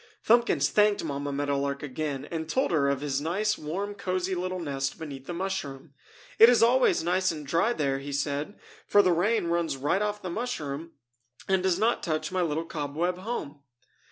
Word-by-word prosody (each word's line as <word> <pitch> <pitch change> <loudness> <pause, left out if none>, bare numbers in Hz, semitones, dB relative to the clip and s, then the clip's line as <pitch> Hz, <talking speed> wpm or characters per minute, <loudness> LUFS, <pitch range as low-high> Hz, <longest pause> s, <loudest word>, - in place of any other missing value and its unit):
Thumbkins 235 +2 +4
thanked 210 -1 +3
Mamma 145 -2 -3
Meadow 140 0 -1
Lark 140 +1 -2
again, 145 -1 -4
and 160 -1 -4
told 260 +2 +1
her 145 -4 +2
of 140 -1 -1
his 140 -1 -1
nice 205 +7 0
warm 190 +7 -4
cozy 185 -1 -2
little 185 +1 -2
nest 135 -4 -3
beneath 140 -4 -8
the - - -4
mushroom. 165 -6 -4 0.5
"It 225 - +10
is 245 -2 +5
always 245 -6 +4
nice 185 +2 +1
and 150 -2 -7
dry 170 - +2
there," 140 -7 -1
he 140 +1 -7
said, 145 +6 -2 0.3
"for 205 - +5
the 185 - +3
rain 205 +5 +1
runs 170 -4 0
right 145 +9 0
off 210 0 -2
the 180 - -4
mushroom 165 - -4 0.5
and 190 -1 +2
does 185 -2 +1
not 225 +4 +1
touch 155 -2 -2
my 185 - 0
little 165 -1 -1
cobweb 165 +4 -2
home!" 185 -9 -5
165 Hz, 185 wpm, -27 LUFS, 145-195 Hz, 0.5 s, It